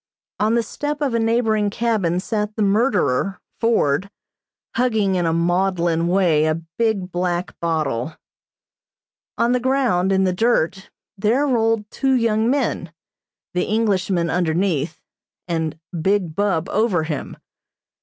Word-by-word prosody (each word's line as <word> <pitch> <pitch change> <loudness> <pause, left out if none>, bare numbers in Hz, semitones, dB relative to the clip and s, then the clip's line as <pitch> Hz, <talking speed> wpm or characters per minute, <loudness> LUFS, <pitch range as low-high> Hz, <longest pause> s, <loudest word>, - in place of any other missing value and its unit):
On 215 +2 +2
the 235 - +2
step 295 +5 -4
of 285 -5 0
a 230 - +2
neighboring 225 -2 +1
cabin 200 -6 0
sat 210 +1 -2
the 215 - 0
murderer, 195 - +1 0.2
Ford, 200 -7 +1 0.7
hugging 220 -5 +1
in 175 -2 +1
a - - +2
maudlin 170 0 +1
way 175 -4 +3
a 155 +1 0 0.2
big 210 -5 0
black 175 0 -2
bottle. 155 -4 -1 1.2
On 235 - +2
the 250 - +2
ground, 245 -8 +1
in 190 0 +3
the 185 -1 +1
dirt, 195 -3 0 0.3
there 235 +8 +2
rolled 225 -5 +1
two 270 -1 +1
young 230 -2 +2
men, 250 - -1 0.6
the 180 - 0
Englishman 190 -6 0
underneath, 170 -2 0 0.5
and 160 -2 -2 0.2
Big 190 -3 0
Bub 195 -4 0
over 205 -6 +1
him. 155 -3 -5
195 Hz, 130 wpm, -21 LUFS, 170-225 Hz, 1.2 s, way